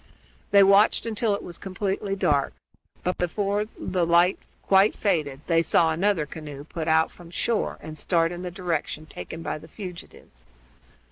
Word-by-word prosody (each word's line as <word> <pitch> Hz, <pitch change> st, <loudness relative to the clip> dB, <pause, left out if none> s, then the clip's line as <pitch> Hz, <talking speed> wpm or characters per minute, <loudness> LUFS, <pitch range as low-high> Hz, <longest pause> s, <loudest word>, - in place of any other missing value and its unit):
They 200 Hz, 0 st, +7 dB
watched 200 Hz, +4 st, +5 dB
until 220 Hz, -2 st, 0 dB
it -, -, -7 dB
was 175 Hz, -, -8 dB
completely 195 Hz, +1 st, -2 dB
dark; 145 Hz, -7 st, +1 dB, 0.5 s
but, 180 Hz, -, -1 dB
before 200 Hz, +4 st, 0 dB
the 180 Hz, -2 st, -1 dB
light 170 Hz, +2 st, +4 dB, 0.2 s
quite 195 Hz, +2 st, +4 dB
faded, 150 Hz, -9 st, -1 dB
they 165 Hz, -1 st, +3 dB
saw 165 Hz, 0 st, +3 dB
another 175 Hz, -1 st, +1 dB
canoe 145 Hz, -2 st, -8 dB
put 160 Hz, +1 st, -5 dB
out 160 Hz, 0 st, +3 dB
from 175 Hz, -1 st, -14 dB
shore 220 Hz, +6 st, -1 dB
and 155 Hz, 0 st, -7 dB
start 165 Hz, -2 st, +2 dB
in 175 Hz, 0 st, -6 dB
the 180 Hz, -, -4 dB
direction 170 Hz, -3 st, -3 dB
taken 155 Hz, -, -8 dB
by -, -, -3 dB
the -, -, -13 dB
fugitives. 175 Hz, -, -10 dB
175 Hz, 160 wpm, -25 LUFS, 160-195 Hz, 0.5 s, They